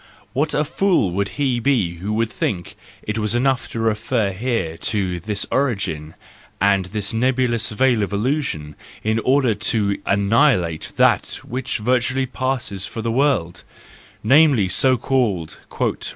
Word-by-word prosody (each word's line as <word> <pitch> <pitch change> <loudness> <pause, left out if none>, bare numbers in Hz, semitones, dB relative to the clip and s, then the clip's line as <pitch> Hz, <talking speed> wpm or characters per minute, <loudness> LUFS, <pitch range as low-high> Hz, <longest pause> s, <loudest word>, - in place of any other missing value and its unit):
What 150 +4 0
a 150 - +2
fool 170 - +1
he 135 +4 -1
would 120 - -5
be 110 -12 +1
who 95 +5 -4
would 110 0 0
think 90 -4 -3 0.3
it 105 +1 -3
enough 120 +5 0
to 115 - -5
refer 110 -1 0
here 110 -5 -2
to 95 -4 -1
this 105 +3 -1
origin 95 - -1 0.4
and 100 -1 +3
this 105 +2 -4
nebulous 120 -1 +1
veil 120 0 +2
of 100 - -2
illusion, 105 - -2 0.3
in 110 +1 +1
order 130 -1 +2
to 105 -1 0
annihilate 100 - +2
that - - +2
which 130 +2 -3
virtually 125 +3 +1
passes 130 -7 -3
for 115 - -6
the 115 - -1
world—namely, 125 - +1
so 130 +5 +3
called 105 - -1 0.2
"reality - - -1
115 Hz, 135 wpm, -21 LUFS, 100-130 Hz, 0.4 s, and